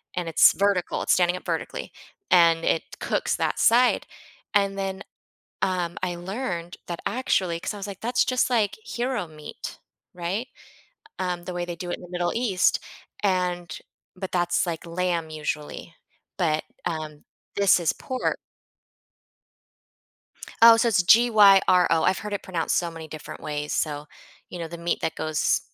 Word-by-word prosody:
and 175 -2 -2
it's 160 - +6
vertical, 195 -3 0
it's - - +2
standing 180 0 +2
up - - -13
vertically, - - -4 0.4
and 165 -2 +5
it 165 - +1 0.2
cooks - - -1
that - - -1
side, 245 +2 +4 0.5
and 200 -1 +2
then, 195 0 -3 0.6
um, 180 -2 -1
I 180 -1 -1
learned 175 -2 -4
that 170 -1 -5
actually 185 -9 0
'cause 210 - -4
I - - -7
was 195 - -5
like, 195 -2 -8
that's 245 +2 +1
just 255 -2 +1
like 225 -4 +1
hero 240 - -2
meat, 155 -1 -9 0.4
right? 180 +7 -3 0.7
Um, 180 -2 -2
the 180 - -5
way 175 0 -2
they 175 -1 -5
do 175 +1 -6
it - - -2
in - - -17
the 180 - -11
Middle 175 -1 -1
East, 215 -6 +2 0.4
and 180 -3 -1 0.4
but 190 0 -5
that's, 175 -1 +1
like, 165 0 -4
lamb 170 -1 -1
usually, 155 +2 -5 0.4
but, 155 -4 +1 0.2
um, 155 -3 -4 0.3
this 200 -2 +5
is 165 - +1
por 260 -1 -2 2.2
Oh, 230 0 +10
so 230 +1 +2
it's 195 -5 +3
G-Y-R-O. 195 -6 +6
I've 185 - +2
heard 210 0 -6
it 200 - -3
pronounced 175 -3 -1
so 170 -1 0
many 165 -1 -9
different 155 -1 -9
ways, 150 0 -4
so, 150 -1 -2 0.4
you 180 - -8
know, 165 - -4
the 170 - -8
meat 170 0 -1
that 160 - -1
goes 155 -1 0
180 Hz, 160 wpm, -25 LUFS, 170-200 Hz, 2.2 s, Oh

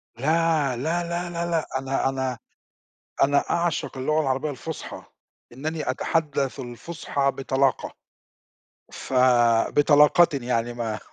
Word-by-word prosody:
لا، 155 0 +1
لا، 165 +6 -1
لا، 170 0 -3
لأ، 165 -2 -1
أنا 135 0 -1
أنا 130 -2 -2 0.9
أنا 140 +1 +3
أعشق 170 -5 -1
اللغة 155 +4 +1
العربية 135 +2 -1
الفُصحى، 155 +3 -7 0.5
إنّني 155 +2 -4
أتحدث 140 -1 -1
الفصحى 140 +2 -3
بطلاقة 135 -1 0 1.0
ف - - -8 0.6
بطلاقةٍ 150 +3 +5
يعني 120 -1 -1
ما 115 -3 -4
145 Hz, 105 wpm, -24 LUFS, 130-165 Hz, 1.0 s, بطلاقةٍ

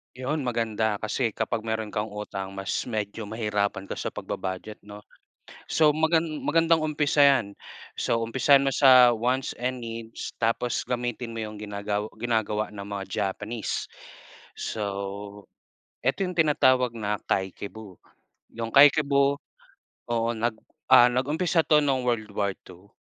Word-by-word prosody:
'Yon, 135 +4 -2
maganda 110 -3 -1
kasi 115 +2 -1
kapag 110 - -2
meron 110 -1 -2
kang 105 +1 -3
utang 100 -2 -6
mas 95 -1 -3
medyo 110 -1 -4
mahirapan 105 -2 -2
ka - - -5
sa - - -4
pagbu-budget 95 +3 -5
'no. 105 0 -11 0.7
So 155 -1 +3
magan 160 0 0
magandang 165 +2 +3
umpisa 150 -1 +3
'yan, 115 -8 +2 0.4
so 115 - 0
umpisahan 130 +4 +4
mo 140 - +1
sa 125 -3 +6
wants 125 +4 -1
and 125 0 -3
needs 115 -1 -6
tapos 115 +1 -1
gamitin 120 -1 -3
mo 115 - -4
'yong 105 -1 -6
ginagaw 105 0 -3 0.2
ginagawa 110 -3 0
ng 100 -1 -8
mga 100 -1 -5
Japanese, 105 +3 -3 0.7
so 110 - -4 1.2
ito - - +1
'yong 180 -1 -6
tinatawag 130 -6 +3
na 105 -1 -1
kakeibo. 100 +1 -4 0.6
'Yong 115 0 -5
kakeibo 140 -1 +5 0.8
oo, 115 0 +1
nag 115 +1 0 0.4
ah, 120 - +9
nag-umpisa 155 +6 +1
'to 150 -1 +4
nung 135 -3 0
World 115 -3 -1
War 100 -1 0 0.2
II. 90 +2 -15
115 Hz, 135 wpm, -26 LUFS, 105-135 Hz, 1.2 s, ah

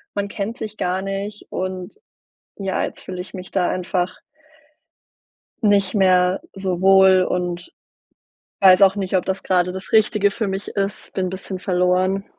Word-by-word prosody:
man 200 0 -1
kennt 215 +4 -4
sich 215 -1 -6
gar 180 +1 -1
nicht 200 +2 -5
und, 185 +1 -4 0.6
ja, 195 -2 -2
jetzt - - -7
fühle 185 -1 -6
ich 190 - -9
mich 185 -1 -8
da 185 -2 +1
einfach 180 0 -2 1.5
nicht 200 -2 +3
mehr 185 -2 +3
so 190 -2 -3
wohl 190 -1 +6
und 180 -1 -2 0.9
weiß 190 0 +6
auch 195 +1 +5
nicht, 190 -1 -2
ob 180 - +1
das 190 0 -3
grade 180 -1 +1
das 190 +3 -9
Richtige 210 -2 +4
für 215 +1 -3
mich 195 +1 -4
ist. 200 0 -3
Bin 185 -1 -1
bisschen 190 0 -6
verloren. 185 +2 +1
190 Hz, 155 wpm, -21 LUFS, 185-200 Hz, 1.5 s, wohl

